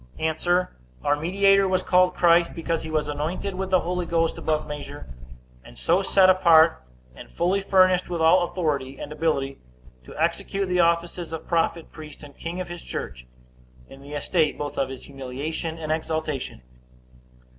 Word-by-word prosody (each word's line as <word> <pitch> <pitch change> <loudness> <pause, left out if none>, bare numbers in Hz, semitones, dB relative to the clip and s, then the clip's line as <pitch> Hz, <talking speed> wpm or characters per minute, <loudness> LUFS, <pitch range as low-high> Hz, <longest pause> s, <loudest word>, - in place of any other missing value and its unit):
A. 160 0 -1 0.7
Our 145 - +2
mediator 195 +5 +3
was 185 -1 0
called 180 0 +3
Christ, 170 -1 +3
because 165 -1 -2
he 160 - -7
was 155 -1 -1
anointed 155 +7 -3
with 190 +1 -4
the 185 -1 +3
Holy 180 0 -3
Ghost 165 0 +1
above 155 -1 -1
measure; 145 -1 -8 0.6
and - - -15
so 175 - +2
set 190 -1 +4
apart, 170 - +5 0.3
and - - -12
fully 180 +4 0
furnished 185 -2 +3
with 175 -1 -3
all 165 +3 +5
authority 150 -7 -2
and 145 - -8
ability, 140 -4 -1 0.5
to - - -12
execute 195 +4 -1
the 180 0 +1
offices 170 0 +1
of 160 - -7
prophet, 165 -1 -1
priest, 155 -1 -11
and 145 -1 -13
king 170 +2 -6
of 185 - -4
his 175 0 -8
church, 60 0 -7 0.6
in 135 - -14
the 140 +1 -11
estate 155 +2 0
both 145 0 -5
of 135 - -1
his 135 -1 -8
humiliation 140 +5 -5
and 155 -1 -4
exaltation. 155 - -3
165 Hz, 165 wpm, -24 LUFS, 150-180 Hz, 0.7 s, apart